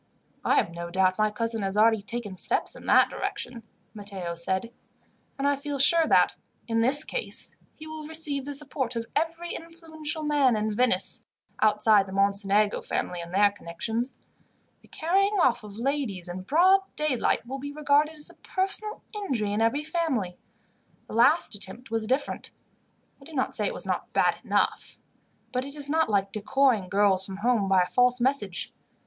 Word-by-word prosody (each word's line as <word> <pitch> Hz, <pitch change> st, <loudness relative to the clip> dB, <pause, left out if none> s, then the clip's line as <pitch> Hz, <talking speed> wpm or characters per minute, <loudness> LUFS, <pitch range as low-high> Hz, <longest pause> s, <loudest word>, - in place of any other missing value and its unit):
"I -, -, +2 dB
have -, -, +2 dB
no 170 Hz, 0 st, -6 dB
doubt 185 Hz, +2 st, +1 dB
my 215 Hz, 0 st, +3 dB
cousin 225 Hz, +1 st, -2 dB
has 195 Hz, +1 st, -2 dB
already 220 Hz, 0 st, +4 dB
taken 210 Hz, -2 st, -6 dB
steps -, -, 0 dB
in -, -, -12 dB
that -, -, +5 dB
direction," 245 Hz, -1 st, -4 dB, 0.3 s
Matteo 200 Hz, -5 st, -2 dB
said, 190 Hz, +6 st, -2 dB, 0.7 s
"and 275 Hz, 0 st, 0 dB
I 285 Hz, -, +3 dB
feel 285 Hz, 0 st, -5 dB
sure 320 Hz, +4 st, +5 dB
that, -, -, +3 dB, 0.3 s
in 225 Hz, -1 st, 0 dB
this 275 Hz, +6 st, +4 dB
case, 475 Hz, -, -4 dB, 0.2 s
he 310 Hz, -, -11 dB
will 315 Hz, -1 st, -8 dB
receive 305 Hz, -4 st, 0 dB
the 285 Hz, 0 st, 0 dB
support 270 Hz, -4 st, +1 dB
of 230 Hz, 0 st, -3 dB
every 335 Hz, +2 st, -2 dB
influential 320 Hz, -2 st, -6 dB
man 290 Hz, -5 st, +3 dB
in 215 Hz, 0 st, -1 dB
Venice, 230 Hz, -6 st, +1 dB, 0.4 s
outside 210 Hz, -1 st, +4 dB
the 190 Hz, -, -8 dB
Mocenigo 200 Hz, +1 st, +2 dB
family 175 Hz, -1 st, -3 dB
and 170 Hz, 0 st, -9 dB
their 200 Hz, +2 st, +4 dB
connections. 220 Hz, +7 st, -4 dB, 0.6 s
The -, -, -21 dB
carrying 390 Hz, +5 st, +1 dB
off 255 Hz, -8 st, +2 dB
of 205 Hz, -1 st, -10 dB
ladies, 240 Hz, -8 st, -2 dB
in 175 Hz, +1 st, -6 dB
broad 345 Hz, -, +4 dB, 0.2 s
daylight, 280 Hz, -6 st, 0 dB
will 265 Hz, +3 st, -6 dB
be 285 Hz, +1 st, -6 dB
regarded 300 Hz, +1 st, +2 dB
as 300 Hz, -1 st, -3 dB
a -, -, -20 dB
personal 395 Hz, +3 st, 0 dB
injury 250 Hz, -, -2 dB
in 210 Hz, -, 0 dB
every 230 Hz, +7 st, +1 dB
family. 300 Hz, -, -2 dB, 0.7 s
The -, -, -11 dB
last 270 Hz, +9 st, +4 dB
attempt 225 Hz, +4 st, -2 dB
was 225 Hz, -1 st, -1 dB
different. 265 Hz, +4 st, -2 dB, 0.7 s
I -, -, -14 dB
do 325 Hz, -, -13 dB
not 260 Hz, -3 st, -1 dB
say -, -, +1 dB
it -, -, -3 dB
was -, -, -5 dB
not -, -, -3 dB
bad -, -, +2 dB
enough, -, -, -1 dB, 0.5 s
but 250 Hz, -1 st, -1 dB
it 280 Hz, +2 st, -9 dB
is 290 Hz, -2 st, -2 dB
not 320 Hz, 0 st, +1 dB
like 195 Hz, -2 st, +1 dB
decoying 215 Hz, -2 st, +1 dB
girls 195 Hz, -1 st, +4 dB
from 190 Hz, 0 st, -3 dB
home 215 Hz, -2 st, +1 dB
by 190 Hz, -1 st, +5 dB
a -, -, -2 dB
false 250 Hz, +5 st, +2 dB
message. 240 Hz, -8 st, -1 dB
240 Hz, 180 wpm, -26 LUFS, 205-295 Hz, 0.7 s, that